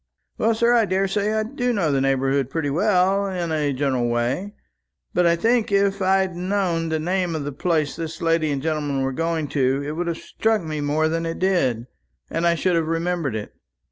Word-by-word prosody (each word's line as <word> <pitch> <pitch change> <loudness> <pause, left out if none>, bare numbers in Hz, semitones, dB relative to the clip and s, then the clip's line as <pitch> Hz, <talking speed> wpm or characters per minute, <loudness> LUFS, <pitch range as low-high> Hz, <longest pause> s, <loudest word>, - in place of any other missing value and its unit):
"Well, 225 +1 +2
sir, 235 +2 +3
I 230 -2 +4
daresay 195 +2 0
I 220 0 +1
do 245 +2 -2
know 185 -10 +1
the 135 -1 +1
neighbourhood 135 0 +1
pretty 145 -1 -2
well, 195 +3 +2
in 175 -3 -3
a 150 -2 0
general 130 -3 0
way. 125 - -1 0.6
But 180 -1 +3
I 170 - +4
think, 225 +5 +1
if 200 0 +2
I'd 190 -1 +2
known 180 -3 -1
the 160 - 0
name 175 +1 -1
of 155 - -3
the 145 - -4
place 155 0 0
this 165 -1 -5
lady 165 -2 +1
and 140 -2 -2
gentleman 145 -4 -1
were 135 - -1
going 165 +1 -1
to, 135 0 +1
it 145 - -3
would 170 +3 -3
have 170 -1 -2
struck 220 +1 -1
me 155 -2 -4
more 150 +2 +1
than 165 +1 -1
it 165 - -4
did, 135 -12 +1 0.5
and 170 - +1
I 170 - +3
should 180 +1 +1
have 165 -1 +1
remembered 165 -5 -1
it. 105 -1 -6
165 Hz, 205 wpm, -22 LUFS, 145-190 Hz, 0.6 s, I